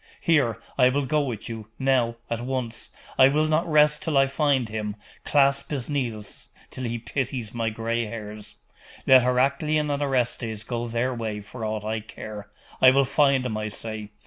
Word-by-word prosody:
Here, 140 Hz, -9 st, +2 dB, 0.2 s
I 125 Hz, -1 st, +7 dB
will 140 Hz, +2 st, 0 dB
go 150 Hz, +3 st, +1 dB
with 120 Hz, -7 st, -4 dB
you 110 Hz, -2 st, -7 dB
now 130 Hz, -3 st, +2 dB
at 115 Hz, 0 st, -3 dB
once 125 Hz, -2 st, -4 dB, 0.3 s
I 130 Hz, -, +9 dB
will 150 Hz, +3 st, +2 dB
not 155 Hz, +2 st, +1 dB
rest 150 Hz, 0 st, +4 dB
till 160 Hz, -6 st, 0 dB
I 135 Hz, -, +6 dB
find 135 Hz, -3 st, +1 dB
hint, 105 Hz, -1 st, -4 dB, 0.3 s
clasp 140 Hz, -1 st, +2 dB
his 140 Hz, -4 st, -4 dB
knees 120 Hz, -8 st, -4 dB, 0.2 s
till 130 Hz, -, -5 dB
he 120 Hz, 0 st, -2 dB
pities 120 Hz, -2 st, -4 dB
my 115 Hz, -1 st, -1 dB
gray 115 Hz, +1 st, -2 dB
hairs! 105 Hz, -1 st, -8 dB, 0.5 s
Let 130 Hz, -1 st, +7 dB
Heraclian 140 Hz, +4 st, +1 dB
and 140 Hz, 0 st, -1 dB
Orestes 120 Hz, -5 st, -1 dB
go 120 Hz, 0 st, -3 dB
their 120 Hz, +3 st, -1 dB
way 110 Hz, -3 st, -4 dB
for 110 Hz, +3 st, -9 dB
aught 110 Hz, -1 st, -3 dB
I 110 Hz, +1 st, -1 dB
care 105 Hz, -1 st, -9 dB, 0.3 s
I 130 Hz, -, +9 dB
will 135 Hz, +1 st, +4 dB
find 140 Hz, -1 st, +3 dB
him, 115 Hz, -4 st, -2 dB
I 110 Hz, 0 st, -2 dB
say. 110 Hz, 0 st, -5 dB
125 Hz, 180 wpm, -25 LUFS, 110-140 Hz, 0.5 s, I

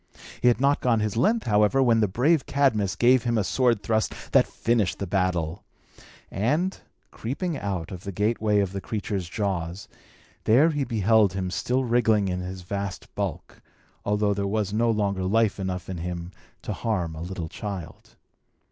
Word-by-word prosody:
He -, -, +3 dB
had 120 Hz, -, +4 dB
not 140 Hz, +2 st, +2 dB
gone 120 Hz, -3 st, +2 dB
his 105 Hz, -1 st, -1 dB
length, 215 Hz, -, +2 dB
however, 105 Hz, +5 st, +3 dB
when 115 Hz, -3 st, +4 dB
the 105 Hz, -, +3 dB
brave 135 Hz, -, +2 dB
Cadmus 110 Hz, -9 st, +1 dB
gave 125 Hz, +1 st, +4 dB
him 120 Hz, -1 st, 0 dB
a 105 Hz, -, +2 dB
sword 120 Hz, -1 st, +1 dB
thrust 110 Hz, +1 st, 0 dB, 0.2 s
that -, -, +5 dB
finished 115 Hz, -5 st, 0 dB
the 100 Hz, -, -3 dB
battle; 90 Hz, -4 st, -1 dB, 0.7 s
and, 150 Hz, -, 0 dB, 0.4 s
creeping 155 Hz, +9 st, -3 dB
out 95 Hz, -, -4 dB
of 90 Hz, -2 st, -8 dB
the 100 Hz, -, -5 dB
gateway 105 Hz, +1 st, +1 dB
of 95 Hz, -2 st, -1 dB
the 100 Hz, 0 st, -5 dB
creature's 100 Hz, -4 st, -3 dB
jaws, 95 Hz, -1 st, -3 dB, 0.6 s
there 140 Hz, +9 st, +5 dB
he 145 Hz, -2 st, -1 dB
beheld 110 Hz, -3 st, +3 dB
him 95 Hz, -1 st, -3 dB
still 125 Hz, +7 st, 0 dB
wriggling 115 Hz, -4 st, +2 dB
his 90 Hz, 0 st, -4 dB
vast 100 Hz, +1 st, -5 dB
bulk, -, -, -5 dB, 0.4 s
although 105 Hz, 0 st, +1 dB
there 100 Hz, 0 st, -2 dB
was 105 Hz, -1 st, -1 dB
no 115 Hz, +2 st, +2 dB
longer 100 Hz, -3 st, 0 dB
life 105 Hz, +2 st, +2 dB
enough 90 Hz, -1 st, -3 dB
in 95 Hz, -, -5 dB
him 85 Hz, +1 st, -5 dB, 0.3 s
to -, -, -3 dB
harm 90 Hz, -8 st, -2 dB
a 80 Hz, -, -7 dB
little 85 Hz, -1 st, -5 dB
child. 95 Hz, -1 st, -7 dB
105 Hz, 170 wpm, -25 LUFS, 95-120 Hz, 0.7 s, that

